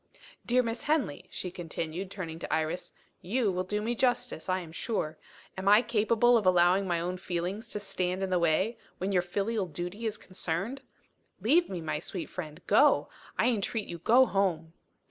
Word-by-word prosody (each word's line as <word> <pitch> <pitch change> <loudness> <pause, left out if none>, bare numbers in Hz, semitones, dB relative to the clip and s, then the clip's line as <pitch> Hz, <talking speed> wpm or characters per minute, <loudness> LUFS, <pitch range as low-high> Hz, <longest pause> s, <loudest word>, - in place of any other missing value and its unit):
"Dear 250 +1 +3
Miss 230 0 -3
Henley," 285 - 0
she 180 - -5
continued, 170 +1 -4
turning 165 -5 -6
to - - -6
Iris, 160 +3 -1 0.3
"you 215 +2 +1
will 185 0 -1
do 210 +3 -2
me 235 +2 0
justice, 245 -8 0
I 185 0 +1
am 165 -2 -10
sure. 160 -4 -3 0.4
Am 190 +1 -4
I 210 +4 +7
capable 235 +1 +4
of 215 - -1
allowing 180 +2 +4
my 175 -2 +1
own 180 +2 -2
feelings 180 +4 -3
to 210 - -3
stand 190 -2 -2
in 190 - -2
the 180 - +3
way, 170 +7 +1 0.2
when 190 +2 -2
your 180 -2 +3
filial 200 +3 -1
duty 175 +8 -4
is 215 -1 -3
concerned? 190 +8 -3 0.6
Leave 300 - +3
me, 180 -3 -4
my 155 -2 -2
sweet 175 +2 -5
friend. 160 -1 -7
Go! 280 +8 +4 0.3
I 240 - +4
entreat 220 -1 -1
you, 170 - -6
go 245 +9 +6
home!" 175 -7 0
190 Hz, 185 wpm, -30 LUFS, 175-220 Hz, 0.6 s, I